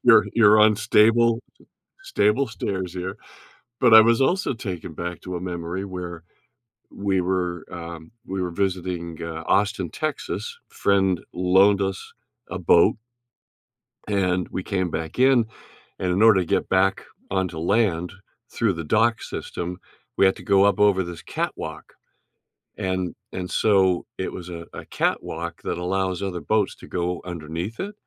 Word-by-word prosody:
"You're 120 Hz, -2 st, +7 dB
you're 110 Hz, -2 st, +6 dB
on 105 Hz, 0 st, +5 dB
stable 115 Hz, +2 st, +4 dB, 0.6 s
stable 105 Hz, +7 st, +2 dB
stairs 95 Hz, -5 st, -4 dB
here," 95 Hz, +3 st, -4 dB, 0.7 s
but 120 Hz, -3 st, +6 dB
I 110 Hz, -, +11 dB
was 115 Hz, +3 st, +3 dB
also 180 Hz, +1 st, +1 dB
taken 90 Hz, -8 st, -6 dB
back 85 Hz, +2 st, -5 dB
to 90 Hz, -1 st, -6 dB
a 85 Hz, -, -4 dB
memory 90 Hz, +1 st, -4 dB
where 90 Hz, -3 st, -7 dB, 0.7 s
we 100 Hz, -2 st, 0 dB
were 90 Hz, -2 st, -1 dB
um, 85 Hz, -1 st, -8 dB
we 95 Hz, 0 st, -3 dB
were 90 Hz, -, -2 dB
visiting, 90 Hz, -3 st, -2 dB
uh, 80 Hz, 0 st, -5 dB
Austin, 100 Hz, -4 st, +1 dB
Texas, 155 Hz, -, -4 dB
friend 95 Hz, -3 st, +1 dB
loaned 95 Hz, +3 st, +4 dB
us 95 Hz, -1 st, -4 dB, 0.4 s
a 95 Hz, -, -4 dB
boat. 85 Hz, 0 st, +5 dB, 1.1 s
And 90 Hz, -3 st, 0 dB
we 95 Hz, -, -4 dB
came 95 Hz, -3 st, -1 dB
back 80 Hz, +7 st, -5 dB
in, 130 Hz, -3 st, +5 dB, 0.5 s
and 90 Hz, -1 st, 0 dB
in 95 Hz, +4 st, +1 dB
order 110 Hz, -4 st, +6 dB
to -, -, -3 dB
get -, -, 0 dB
back 95 Hz, +1 st, +2 dB, 0.3 s
onto 95 Hz, -3 st, -1 dB
land 90 Hz, -1 st, +1 dB, 0.4 s
through 110 Hz, -5 st, +1 dB
the 85 Hz, -1 st, -5 dB
dock 110 Hz, +7 st, +2 dB
system, 90 Hz, +1 st, -5 dB, 0.4 s
we -, -, +5 dB
had 95 Hz, -, +3 dB
to -, -, -11 dB
go 100 Hz, -1 st, +4 dB
up 100 Hz, -1 st, +2 dB
over 100 Hz, -2 st, +4 dB
this 85 Hz, -1 st, -8 dB
catwalk, -, -, -5 dB, 0.8 s
and 95 Hz, -1 st, -2 dB, 0.2 s
and 90 Hz, -1 st, -4 dB
so, 95 Hz, -1 st, +3 dB
it 95 Hz, -, -3 dB
was 90 Hz, -1 st, -8 dB
a 85 Hz, -1 st, -7 dB
a -, -, -7 dB
catwalk 85 Hz, +1 st, -2 dB
that -, -, -2 dB
allows 95 Hz, 0 st, -1 dB
other 90 Hz, -3 st, -3 dB
boats 110 Hz, -2 st, 0 dB
to -, -, -13 dB
go 90 Hz, 0 st, -2 dB
underneath 85 Hz, +5 st, -5 dB
it, 205 Hz, +2 st, -4 dB
95 Hz, 155 wpm, -23 LUFS, 90-105 Hz, 1.1 s, I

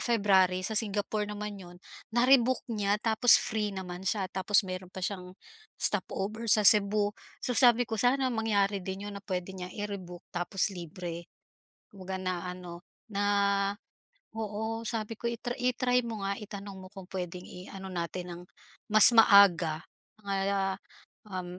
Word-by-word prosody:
February 190 Hz, -5 st, +1 dB
sa 220 Hz, -, -4 dB
Singapore 210 Hz, 0 st, -2 dB
naman 210 Hz, -1 st, -7 dB
'yon, 175 Hz, -1 st, -13 dB, 0.4 s
na-rebooked 255 Hz, 0 st, +2 dB
niya 205 Hz, -2 st, -1 dB
tapos 225 Hz, +1 st, +5 dB
free 215 Hz, -1 st, -3 dB
naman 180 Hz, -2 st, -8 dB
siya 200 Hz, -1 st, -1 dB
tapos 195 Hz, +2 st, +1 dB
mayro'n 185 Hz, -1 st, -7 dB
pa 190 Hz, -, -6 dB
siyang 185 Hz, -1 st, -7 dB, 0.4 s
stopover 220 Hz, +4 st, -2 dB
sa 210 Hz, 0 st, +4 dB
Cebu, 205 Hz, 0 st, +4 dB, 0.3 s
so 250 Hz, -, +1 dB
sabi 245 Hz, -1 st, +10 dB
ko 225 Hz, -1 st, -5 dB
sana 260 Hz, +1 st, +1 dB
mangyari 205 Hz, -3 st, -1 dB
din 190 Hz, +2 st, -7 dB
'yon 205 Hz, -, -9 dB
na -, -, -17 dB
puwede 185 Hz, -1 st, -5 dB
niyang 180 Hz, -1 st, -9 dB
i-rebook 195 Hz, -4 st, -8 dB
tapos 180 Hz, +3 st, -2 dB
libre. 170 Hz, -1 st, -8 dB, 0.7 s
'Wag 190 Hz, 0 st, -7 dB
na 185 Hz, -1 st, -4 dB
ano, 175 Hz, -1 st, -11 dB, 0.3 s
na 200 Hz, -1 st, -3 dB, 1.1 s
oo, 220 Hz, +1 st, -5 dB
sabi 225 Hz, -1 st, -4 dB
ko, 235 Hz, -, -6 dB
i-tr 240 Hz, +1 st, -6 dB
i-try 250 Hz, 0 st, 0 dB
mo 220 Hz, -3 st, -7 dB
nga, 200 Hz, 0 st, -3 dB
itanong 200 Hz, -2 st, -10 dB
mo -, -, -13 dB
kung 195 Hz, -2 st, -12 dB
puwedeng 180 Hz, -1 st, -6 dB
i-ano 190 Hz, +1 st, -11 dB
natin 175 Hz, +1 st, -5 dB
ng 175 Hz, -, -10 dB, 0.5 s
mas 215 Hz, +1 st, +10 dB
maaga, 180 Hz, -7 st, +4 dB, 0.4 s
mga 195 Hz, -1 st, -2 dB, 0.5 s
um, 180 Hz, -2 st, -7 dB
200 Hz, 145 wpm, -28 LUFS, 185-220 Hz, 1.1 s, sabi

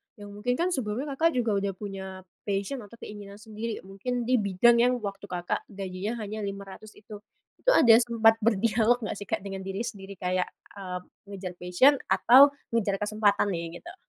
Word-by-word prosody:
yang 205 Hz, -1 st, -11 dB
mungkin 215 Hz, +5 st, -2 dB
kan 355 Hz, +5 st, 0 dB
sebelumnya 260 Hz, +1 st, -2 dB
Kakak 320 Hz, +3 st, +1 dB
juga 235 Hz, -3 st, +1 dB
udah 195 Hz, 0 st, -2 dB
punya 190 Hz, -1 st, -7 dB, 0.2 s
passion 200 Hz, +7 st, -2 dB
atau 225 Hz, 0 st, -12 dB
keinginan 205 Hz, -1 st, -9 dB
sendiri 220 Hz, +1 st, -6 dB
mungkin 225 Hz, +6 st, -4 dB
di 250 Hz, 0 st, +2 dB
bidang 205 Hz, +4 st, +4 dB
yang 245 Hz, +1 st, +4 dB
waktu 200 Hz, 0 st, -6 dB
Kakak 175 Hz, -1 st, -3 dB
gajinya 195 Hz, +2 st, -5 dB
hanya 215 Hz, +1 st, -5 dB
500 200 Hz, +1 st, -7 dB
itu. 210 Hz, -1 st, -11 dB, 0.4 s
Itu -, -, +3 dB
ada 235 Hz, -, +6 dB
sempat 225 Hz, -2 st, +3 dB
berdialog 230 Hz, +2 st, +2 dB
nggak 205 Hz, -, -4 dB
sih 205 Hz, -, -8 dB
Kak -, -, -2 dB
dengan 195 Hz, -1 st, -5 dB
diri 195 Hz, +4 st, -4 dB
sendiri 200 Hz, -3 st, -7 dB
kayak, 180 Hz, 0 st, -1 dB, 0.3 s
eee, 180 Hz, -2 st, -5 dB, 0.3 s
mengejar 195 Hz, -2 st, -6 dB
passion 255 Hz, +11 st, +4 dB
atau 240 Hz, +9 st, +7 dB, 0.2 s
mengejar 205 Hz, -4 st, +1 dB
kesempatan 210 Hz, 0 st, +1 dB
nih, 170 Hz, -1 st, -4 dB
gitu? 345 Hz, +2 st, -10 dB
205 Hz, 175 wpm, -27 LUFS, 195-235 Hz, 0.4 s, atau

